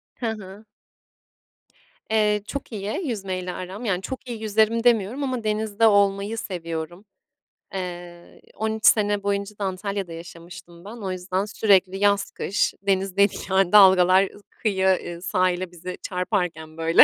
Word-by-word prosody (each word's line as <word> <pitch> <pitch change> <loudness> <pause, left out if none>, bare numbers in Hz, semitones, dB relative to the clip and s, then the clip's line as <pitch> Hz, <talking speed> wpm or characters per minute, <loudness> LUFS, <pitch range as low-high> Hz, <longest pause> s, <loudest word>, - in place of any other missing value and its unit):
Hı 245 - -5
hı. 205 0 -10 1.5
Eee, 210 -2 +2
çok 280 -3 -6
iyi 215 - -3
yüzmeyle 185 -5 -3
aram. 190 +7 -7
Yani, 190 -3 -1
çok 260 +2 -7
iyi 225 -2 -6
yüzerim 220 +2 +2
demiyorum 235 +3 +2
ama 255 -4 -2
denizde 215 +1 +1
olmayı 200 +1 +2
seviyorum. 175 0 -5 0.7
Eee, 175 -2 -7
13 220 0 -2
sene 205 -2 +4
boyunca 200 +1 -2
da 205 - -4
Antalya'da 190 -1 -3
yaşamıştım 170 +1 -11
ben, 220 +3 -8
o 195 -4 -4
yüzden 185 +2 -2
sürekli 195 -3 +2
yaz, 200 0 +2
kış 200 - 0
denizdeydik. 195 +1 +1
Yani, 190 -1 +3
dalgalar, 190 -2 +7
ııı, 205 - -16
kıyıya, 190 -3 +1
eee, 175 0 -8
sahile, 185 0 0
bize 180 +1 -7
çarparken, 180 -4 -2
böyle, 165 +1 +6
195 Hz, 135 wpm, -24 LUFS, 180-210 Hz, 1.5 s, dalgalar